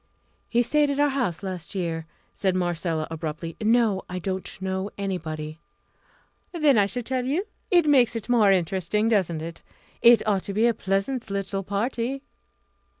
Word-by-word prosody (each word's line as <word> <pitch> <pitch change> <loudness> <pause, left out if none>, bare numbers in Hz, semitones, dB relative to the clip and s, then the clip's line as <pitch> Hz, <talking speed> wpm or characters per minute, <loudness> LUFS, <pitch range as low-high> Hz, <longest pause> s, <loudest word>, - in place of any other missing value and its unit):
"He 240 0 +3
stayed 295 +4 +2
at 280 0 -1
our 290 0 +4
house 250 - -1
last 185 -1 -5
year," 165 -3 -2 0.3
said 190 -2 0
Marcella, 170 -3 -1
abruptly. 160 +1 -5
"No, 220 -3 +3
I 180 - -4
don't 190 +1 -4
know 190 +1 -2
anybody." 160 -5 -4 0.9
"Then 280 - +4
shall 245 +4 -3
I - - -11
tell 255 +1 -1
you? 300 +10 -1 0.2
It 350 -4 +4
makes 260 -6 +4
it 225 - -4
more 225 -5 +5
interesting, 190 +4 +1
doesn't 175 -7 +1
it? 165 0 -7 0.4
It 235 -1 +6
ought 200 -3 +2
to 200 - -4
be 220 +2 +3
a 235 - +4
pleasant 200 +5 -2
little 195 0 -2
party." 235 +7 -2
200 Hz, 160 wpm, -25 LUFS, 180-240 Hz, 0.9 s, It